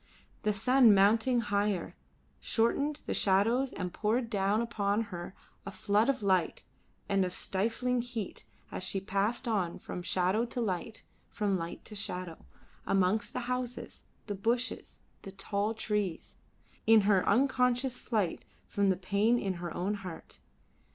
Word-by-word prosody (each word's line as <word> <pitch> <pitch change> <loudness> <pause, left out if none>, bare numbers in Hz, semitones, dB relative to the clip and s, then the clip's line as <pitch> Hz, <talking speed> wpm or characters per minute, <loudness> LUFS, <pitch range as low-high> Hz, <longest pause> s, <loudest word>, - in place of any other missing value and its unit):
The 215 - +1
sun 230 +2 +5
mounting 225 +5 +4
higher, 205 -3 -1 0.4
shortened 280 +6 0
the - - -2
shadows 225 +7 +2
and 180 -2 -5
poured 230 +2 0
down 200 +1 +2
upon 215 -3 0
her 175 +2 -6 0.3
a - - -6
flood 205 +4 +1
of 265 -6 0
light 185 -4 +1 0.4
and 195 -1 +2
of 180 -1 -3
stifling 235 +5 0
heat 235 -5 -5 0.3
as - - -5
she 195 +1 0
passed 200 +6 -1
on 195 -7 0
from 180 - -6
shadow 185 +4 +1
to 245 - -5
light, 220 0 -3 0.3
from 205 -3 0
light 170 -1 -5
to - - -7
shadow, 180 -5 -5 0.4
amongst 195 +2 +1
the - - -2
houses, 250 0 -4 0.2
the 205 - -3
bushes, 230 +5 -2 0.2
the 195 - -8
tall 200 +2 -2
trees, 210 -5 -2 0.5
in 225 -1 +7
her 195 -2 +3
unconscious 250 +1 +2
flight 210 -8 -1 0.2
from 200 -1 +1
the 190 - +2
pain 205 +5 +2
in 195 -5 -1
her 175 -1 -4
own 185 +6 -1
heart. 185 -5 -8
205 Hz, 145 wpm, -31 LUFS, 195-235 Hz, 0.5 s, in